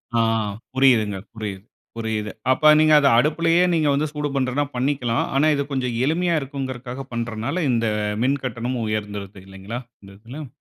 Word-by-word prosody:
ஆ - - +3 0.5
புரியுதுங்க, 120 -7 +3 0.2
புரியுது, 105 -4 -6 0.3
புரியுது. 110 -2 -3 0.2
அப்ப 155 +4 +5
நீங்க 155 0 +5
அத 145 - +3
அடுப்புயலே 165 +5 +3
நீங்க 160 -3 +2
வந்து 145 +2 +1
சூடு 150 -1 -2
பண்றதுனா 135 +2 0
பண்ணிக்கலாம். 125 -2 0
ஆனா, 145 +3 +4
இது 140 - 0
கொஞ்சம் 125 -3 -1
எளிமையா 170 +3 +1
இருக்குங்கிறக்காக 130 -1 -6
பண்றனாள, 115 +4 -3 0.2
இந்த 115 -1 +1 0.4
மின்கட்டணம் 130 -2 -1
உயர்ந்துருது 105 -2 -4
இல்லைங்களா? 95 +5 -7 0.2
இந்த 100 - -13
இதுல, 130 +7 -9
130 Hz, 140 wpm, -22 LUFS, 110-145 Hz, 0.5 s, அப்ப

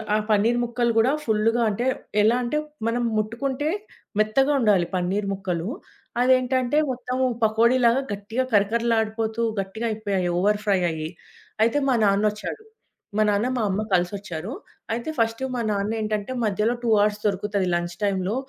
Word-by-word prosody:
ఆ - - +4
పనీర్ 220 +3 +3
ముక్కలు 240 0 0
కూడా 240 +4 +4
ఫుల్‌గా 225 +2 +2
అంటే 215 +4 -2 0.4
ఎలా 225 +3 +4
అంటే, 245 +5 -1 0.3
మనం 240 +1 0
ముట్టుకుంటే 260 +7 -1 0.5
మెత్తగా 240 +7 +3
ఉండాలి 205 -7 +3
పనీర్ 190 +3 -1
ముక్కలు. 185 -3 -3 0.5
అదేంటంటే 255 +1 +2
మొత్తం 255 0 -4 0.3
పకోడీలాగా 235 +3 +4
గట్టిగా 205 +5 -2
కరకరలాడిపోతూ 220 +1 +1 0.2
గట్టిగా 220 +5 -4
అయిపోయాయి. 200 -4 -1
ఓవర్ 205 +2 +2
ఫ్రైయయ్యి. 175 -6 0 0.5
అయితే 230 +5 +2
మా 265 - +3
నాన్నొచ్చాడు. 210 - 0 0.5
మా 215 - +4
నాన్న, 205 +3 +1
మా - - 0
అమ్మ 195 +2 0
కలిసొచ్చారు. 180 +2 -1 0.4
అయితే 235 +6 -3
ఫస్టు 230 +2 0
మా 240 - -1
నాన్నేంటంటే, 215 +1 -2
మధ్యలో 210 +3 +1
2 235 - 0
అవర్స్ 210 0 +1
దొరుకుతుంది 200 -1 -1
లంచ్ 175 0 -3
టైమ్‌లో. 195 +1 0
215 Hz, 135 wpm, -24 LUFS, 200-235 Hz, 0.5 s, ఆ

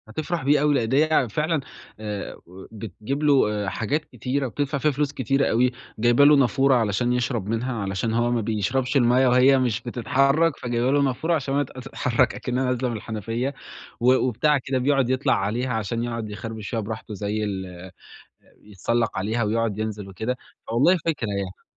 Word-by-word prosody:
هتفرح 155 +7 -3
بيه 145 +1 +3
أوي، 150 0 +3
لأ 125 -5 +1
دي 135 +7 +3
هي 155 -6 +2
فعلًا 155 - 0 0.4
آآ، 105 -2 -5
وبتجيب 105 - -6
له 105 -9 +2
حاجات 145 +10 -2
كتيرة 130 +2 -3
وبتدفع 140 +4 -2
فيها 150 +2 +2
فلوس 145 +1 -1
كتيرة 135 0 +1
أوي، 125 +2 +2 0.3
جايبة 120 +5 +5
له 150 +1 +7
نافورة 135 0 +3
علشان 120 +1 +1
يشرب 120 -4 -1
منها 115 +4 -1
علشان 100 +3 -2
هو 120 +1 +1
ما 120 -1 +1
بيشربش 115 +5 -1
المَيَّة 125 +1 +4
وهي 130 +2 +5
مش 120 -3 0
بتتحرك، 135 +6 +1
فجايبة 120 +1 0
له 145 0 +3
نافورة 140 +5 +1
عشان 135 -3 -2
ما 145 +1 +2
ت 130 - -12
تتحرك 130 -1 0
أكنها 125 +1 -2
نازلة 125 0 0
من 115 - -3
الحنفية، 115 +5 -3 0.5
و 125 +2 +5
وبتاع 130 +4 +2
كده 130 0 -2
بيقعد 135 -1 +2
يطلع 130 +1 +2
عليها 120 +6 -1
عشان 110 +1 -2
يقعد 115 -2 -4
يخربش 110 0 -6
فيها 115 - -2
براحته 110 +1 -6
زي 105 +2 -2
ال 95 -3 -6 0.7
يتسلق 110 +3 -1
عليها 110 +5 0
ويُقعد 110 -1 -1
ينزل 105 -2 -4
وكده، 110 +7 -3 0.3
فوالله 135 +11 +3
فكرة 150 -8 -1
يعني. 100 -2 -5
120 Hz, 175 wpm, -24 LUFS, 110-135 Hz, 0.7 s, له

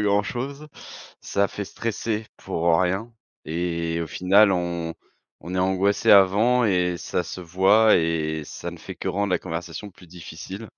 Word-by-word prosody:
grand-chose, 120 +8 -1 0.5
ça 100 0 0
fait 100 - -5
stresser 110 +1 -3
pour, 85 +1 -2
heu, 80 - +3
rien 95 +6 -1 0.4
et 85 0 -2
au - - -4
final, 95 +4 +4
on 85 -2 -2 0.5
on 90 +3 -6
est - - 0
angoissé 95 +2 +2
avant 105 +6 +5
et 90 -3 +1
ça 90 - -2
se 90 - -7
voit 95 +5 +4
et 80 -2 -1
ça 85 - -7
ne 85 - -10
fait 95 +3 -9
que 90 - -5
rendre 100 +2 -1
la - - +2
conversation 90 +4 -6
plus 90 -1 -18
difficile, 90 +4 -9
95 Hz, 160 wpm, -24 LUFS, 85-100 Hz, 0.5 s, avant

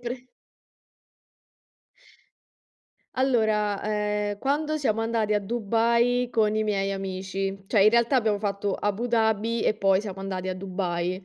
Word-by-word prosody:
pr 245 +1 -6 2.9
Allora, 220 -6 +1
ehm, 210 -1 -1
quando 300 +4 0
siamo 225 -7 0
andati 225 -2 0
a 210 - +2
Dubai 235 +3 +1
con 215 -3 +2
i 215 - +1
miei 195 -2 -1
amici, 195 0 -4
cioè 205 -1 +3
in 210 - +6
realtà 235 +3 +3
abbiamo 215 -4 +1
fatto 200 -1 -2
Abu 205 +4 -2
Dhabi 225 -1 +1
e - - +2
poi 195 -2 +2
siamo 195 -2 -7
andati 190 -1 -4
a 185 - -2
Dubai. 185 -1 -3
210 Hz, 135 wpm, -26 LUFS, 195-230 Hz, 2.9 s, in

